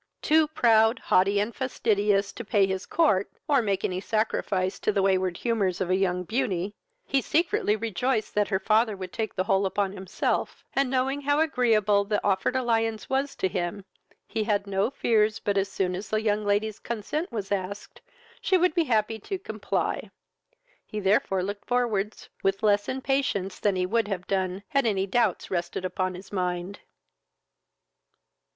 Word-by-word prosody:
Too 310 0 +4
proud, 225 -5 +4
haughty, 195 +2 +2
and 210 +2 -2
fastidious, 205 -6 +1
to 235 - -7
pay 205 -2 +3
his 190 0 -3
court, 250 - +2 0.2
or 285 -4 +4
make 200 -4 -1
any 185 0 -2
sacrifice 195 -3 -1
to - - +1
the 200 -2 +1
wayward 185 -2 +1
humours 200 -6 0
of 185 -2 -1
a - - +4
young 180 -1 0
beauty, 205 -3 -1 0.3
he 275 - +1
secretly 335 - +1
rejoiced 225 +2 -1
that 205 -1 +2
her 190 - +1
father 215 +2 +2
would 185 -1 -7
take 220 -2 -3
the 185 - +1
whole 195 +1 +2
upon 195 0 0
himself; 190 0 -2
and, 275 -1 +1
knowing 265 +2 0
how 285 +1 +2
agreeable 225 -9 +3
the 210 +1 0
offered 200 +5 +1
alliance 225 -3 0
was 270 +1 0
to - - 0
him, 180 +2 -3 0.4
he 220 - -2
had 205 -2 +1
no 200 +2 0
fears 220 -5 +2
but 205 -2 -1
as 195 0 +1
soon 185 -2 -1
as 185 +3 -5
the 215 - +1
young 210 -1 +1
lady's 205 +1 0
consent 235 - -3
was 205 -4 -4
asked, 200 0 -4 0.4
she 375 - +3
would 360 -1 +2
be 335 0 +2
happy 220 -3 +1
to 385 - -4
comply; 390 +6 -3 0.7
he 215 - -6
therefore 195 -1 +2
looked 200 +1 -5
forwards 225 -4 -1
with 195 +2 0
less 205 -1 +3
impatience 260 -8 -1
than 205 -2 +1
he 180 0 +1
would 225 +3 +1
have 185 -3 -3
done, 190 0 -1
had 275 -4 +2
any 195 -3 +1
doubts 235 +5 0
rested 175 0 -2
upon 185 0 -2
his 185 +2 -11
mind. 180 0 -2
205 Hz, 170 wpm, -26 LUFS, 190-235 Hz, 0.7 s, Too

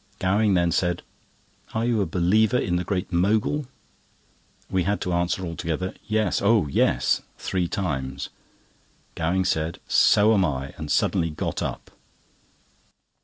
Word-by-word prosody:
Gowing 100 +2 +2
then 85 -1 +2
said: 90 0 0 0.7
"Are 110 +1 +1
you 120 -3 +1
a 100 - 0
believer 105 +7 +2
in 90 -7 0
the 90 - 0
Great 95 0 -3
Mogul?" 110 +10 +1 1.0
We 95 - 0
had 100 +4 0
to 90 - -1
answer 85 +2 0
all 85 -1 -5
together: 85 +3 -3
"Yes—oh, 110 -2 +2
yes!" - - +2 0.2
(three 90 -2 -1
times). 75 -10 -3 0.8
Gowing 90 +3 0
said: 80 0 -1
"So 105 +2 +5
am 100 -3 +3
I," 70 -3 -2
and 75 -2 -7
suddenly 85 - +2
got 75 - -3
up. - - -5
90 Hz, 135 wpm, -24 LUFS, 85-105 Hz, 1.0 s, So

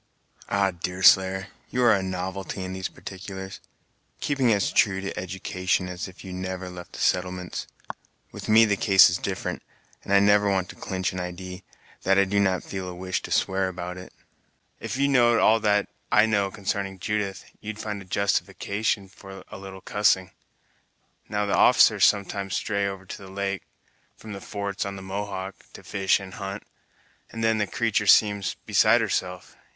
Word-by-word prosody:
"Ah, 100 -1 +2
Deerslayer, 95 +2 +3 0.2
you 125 - 0
are 120 -2 +6
a 100 - +1
novelty 95 +1 -4
in 95 0 -5
these 95 0 -3
particulars; 95 0 -8 0.6
keeping 135 -5 +1
as 100 -2 +1
true 95 -2 +3
to 100 0 -5
education 90 0 -2
as 90 +1 -5
if 95 0 -13
you 95 - -8
had 90 0 -5
never 95 0 -5
left 90 -1 -10
the - - -8
settlements. 90 0 -1 0.6
With - - -8
me 110 +1 +7
the 105 -2 +2
case 95 -2 +6
is - - -1
different, - - -3 0.4
and - - -7
I 100 - +7
never 105 0 +4
want 95 -2 0
to - - -9
clinch 95 -1 -3
an 90 - -4
idee, 90 +1 -6 0.4
that 95 +1 +3
I 100 - +6
do 100 +1 0
not 95 -2 +1
feel 95 -1 -5
a 90 - -7
wish 95 +1 -3
to - - -8
swear 95 0 +1
about 90 -1 -5
it. 90 0 -10 0.7
If - - -4
you 140 +1 +3
know'd 120 -4 +4
all 115 +1 +5
that 105 -2 +2 0.2
I 105 - +6
know 100 -3 +1
consarning 95 0 -3
Judith, 100 0 -3
you'd 110 0 -6
find 105 -2 -5
a - - -11
justification 100 +1 -1
for 95 0 -12
a - - -8
little 95 -1 -9
cussing. 95 -3 +2 1.0
Now, 105 0 0
the 100 - -1
officers - - +6
sometimes 100 -2 0
stray 100 -2 0
over 95 -1 -6
to - - -7
the 95 -1 -11
lake, 100 0 -3 0.5
from 110 -2 -9
the 100 - -7
forts 100 0 -4
on 100 0 -5
the 95 - -8
Mohawk, 95 0 -5 0.2
to - - -12
fish 95 0 +1
and 95 -2 -9
hunt, 100 +2 -6 0.7
and 115 0 -5
then 110 -1 +2
the 105 - 0
creatur' 105 0 0
seems 105 -1 +4
beside - - +5
herself! 90 -1 -3
95 Hz, 180 wpm, -25 LUFS, 95-100 Hz, 1.0 s, me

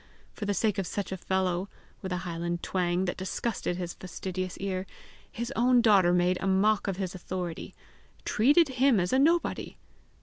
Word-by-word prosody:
for 210 - -5
the 205 - 0
sake 210 -2 +1
of 190 - -2
such 200 0 -4
a - - -1
fellow, 190 0 -1 0.3
with 190 - -5
a 180 - 0
highland 170 0 -3
twang 180 0 0
that 175 - -2
disgusted 190 -1 -2
his 175 -1 -4
fastidious 185 0 -5
ear, 190 -1 -3 0.4
his 235 +3 -4
own 245 +1 +4
daughter 200 -6 +5
made 180 +1 +2
a 195 - -1
mock 200 +3 +2
of 195 -2 -2
his 190 -2 -3
authority, 180 -2 -5 0.5
treated 290 +9 +4
him 265 -6 +5
as 180 +4 0
a 260 - +4
nobody! 330 +4 +1
190 Hz, 175 wpm, -28 LUFS, 180-215 Hz, 0.5 s, daughter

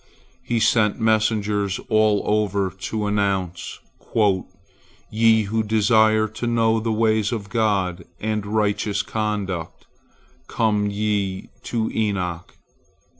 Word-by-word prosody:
He 120 - -1
sent 110 -1 +2
messengers 105 -3 +1
all 110 -3 +3
over 100 -2 0
to 105 +3 -4
announce, 100 -4 -1 1.3
"Ye 110 0 +4
who 110 +2 -1
desire 110 0 +3
to 110 +3 -5
know 115 -1 +2
the 115 0 -2
ways 110 -1 +1
of 105 -4 -4
God 100 -6 0
and 110 -1 -2
righteous 105 -1 0
conduct, 105 -5 -3 0.6
come 105 -2 +1
ye 100 -2 -2 0.2
to 115 -2 -1
Enoch!" 90 -6 -2
105 Hz, 105 wpm, -22 LUFS, 100-110 Hz, 1.3 s, Ye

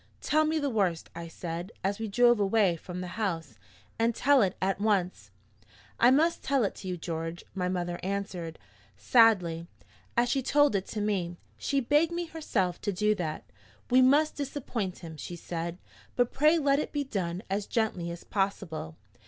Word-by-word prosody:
"Tell 310 +1 +2
me 315 +1 +1
the 290 -2 0
worst," 190 -7 0
I 170 0 -7
said, 170 +3 -6
as 200 +2 -1
we 225 - -2
drove 240 +2 +4
away 200 -3 +3
from 180 +2 -7
the 180 +5 -6
house, 170 -6 -3 0.4
"and 230 0 +2
tell 280 0 +4
it 190 -3 +1
at 195 +1 0
once." 185 - 0 0.7
"I 240 - +7
must 315 +6 +3
tell 275 -3 +1
it 200 - 0
to 190 - -8
you, 180 -1 -2
George," 165 +1 -4
my 180 -2 -1
mother 175 -1 -2
answered, 185 -4 -4 0.4
sadly, 180 -9 +4 0.5
"as 240 +1 +4
she 270 +2 +1
told 290 -2 +3
it 195 -1 -1
to 215 - -4
me. 185 -5 -1 0.2
She 275 -1 0
begged 295 +6 +3
me 345 0 -2
herself 225 - -2
to 205 - -1
do 210 +3 +2
that. 160 -6 -4 0.5
'We 255 +1 +6
must 290 +4 +4
disappoint 255 -9 -3
him,' 160 -1 -8
she 175 - -6
said, 170 0 -5 0.4
'but 245 -1 +1
pray 305 +4 +4
let 280 -2 +3
it - - -3
be 290 -1 -1
done 185 -7 -3
as 195 +1 -2
gently 210 -7 -1
as 170 0 -7
possible.' 195 - -2
200 Hz, 180 wpm, -29 LUFS, 175-255 Hz, 0.7 s, I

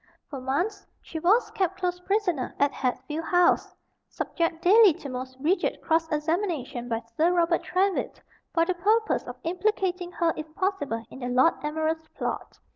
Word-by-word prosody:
For 275 -3 -5
months 290 +12 -1 0.2
she 320 - -7
was 405 +9 +3
kept 380 0 -1
close 360 -1 -1
prisoner 360 - -1
at 285 0 +3
Hatfield 270 +6 -3
House, 355 0 +3 0.3
subject 335 -1 -2
daily 410 0 +7
to 295 -3 -8
most 255 0 -6
rigid 330 +8 +1
cross 325 0 +1
examination 300 - -1
by 230 0 -2
Sir 330 +6 +3
Robert 340 -1 +2
Trywhitt 375 +2 0 0.3
for 330 -1 +3
the 370 - 0
purpose 430 +5 +2
of - - -7
implicating 360 0 -1
her 335 -2 +1
if 310 0 -8
possible 290 - -1
in - - -10
the 245 - -4
Lord 255 +6 +4
Admiral's 315 +1 -2
plot. - - -4
330 Hz, 160 wpm, -26 LUFS, 290-365 Hz, 0.3 s, daily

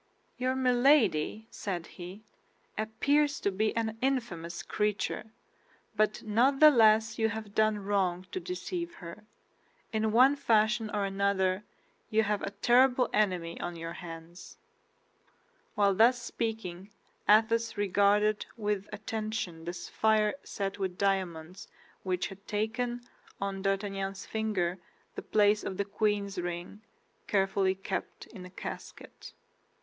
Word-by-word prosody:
"Your 255 +1 -1
Milady," 245 - +3
said 180 -5 -4
he, 185 +4 -10 0.5
"appears 285 +7 +1
to 200 - +1
be 215 +4 0
an 225 -1 -2
infamous 225 -11 -2
creature, 210 -2 -1 0.7
but 215 0 +1
not 245 +6 +2
the 305 0 +9
less 220 -3 +4
you 220 0 +3
have 215 -1 -6
done 215 0 +3
wrong 195 -3 0
to - - -3
deceive 355 -1 -5
her. 175 +4 -10 0.7
In 220 0 +1
one 255 +5 +6
fashion 225 -4 +2
or 205 -1 0
another 195 -1 +1 0.5
you 220 0 +3
have 210 -1 -1
a - - -2
terrible 250 +5 +3
enemy 180 -5 0
on 175 0 -4
your 165 0 -6
hands." 165 0 -10 1.2
While 200 -1 +3
thus 235 +5 +5
speaking 215 -6 -4 0.4
Athos 225 +1 +4
regarded 205 +1 +2
with 205 -2 -2
attention 215 -5 -4
the 175 - -3
sapphire 215 +3 +1
set 195 0 -4
with 185 -2 -3
diamonds 185 -3 -2 0.3
which 185 -1 -1
had 195 +1 -13
taken, 240 +3 -2 0.4
on 195 -1 -3
D'Artagnan's 195 0 -2
finger, 195 -5 -1 0.3
the - - -6
place 210 0 +3
of 190 - -4
the 200 - 0
queen's 200 -1 -1
ring, 175 +3 -5 0.5
carefully 195 -1 +2
kept 190 0 -5
in 195 -5 -11
a - - -14
casket. 185 - -9
210 Hz, 125 wpm, -30 LUFS, 190-220 Hz, 1.2 s, the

